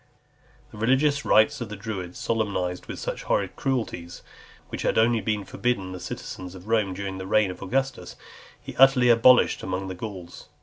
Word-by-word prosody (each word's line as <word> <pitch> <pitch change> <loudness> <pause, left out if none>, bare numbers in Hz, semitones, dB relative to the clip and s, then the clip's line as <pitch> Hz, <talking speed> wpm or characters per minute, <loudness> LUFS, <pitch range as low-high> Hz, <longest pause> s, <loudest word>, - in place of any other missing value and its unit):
The 105 - -11
religious 140 +5 +2
rites 130 +6 +4
of 115 - -4
the 105 - -6
Druids, 95 -4 -6
solemnized 95 -5 -2
with - - -6
such - - -4
horrid 95 -2 0
cruelties, 110 -10 -3 0.5
which - - -5
had - - 0
only 115 0 +3
been 105 0 -2
forbidden 100 -6 -2
the 90 - -7
citizens 90 0 -7
of 95 +2 -12
Rome 105 -4 +1
during 95 0 -5
the 95 - -6
reign 105 -1 +3
of - - -11
Augustus, 135 +5 -2 0.4
he - - -10
utterly 135 -2 +6
abolished 120 +2 +5
among 95 +1 -3
the - - -4
Gauls. 95 -2 -8
105 Hz, 175 wpm, -25 LUFS, 95-120 Hz, 0.5 s, utterly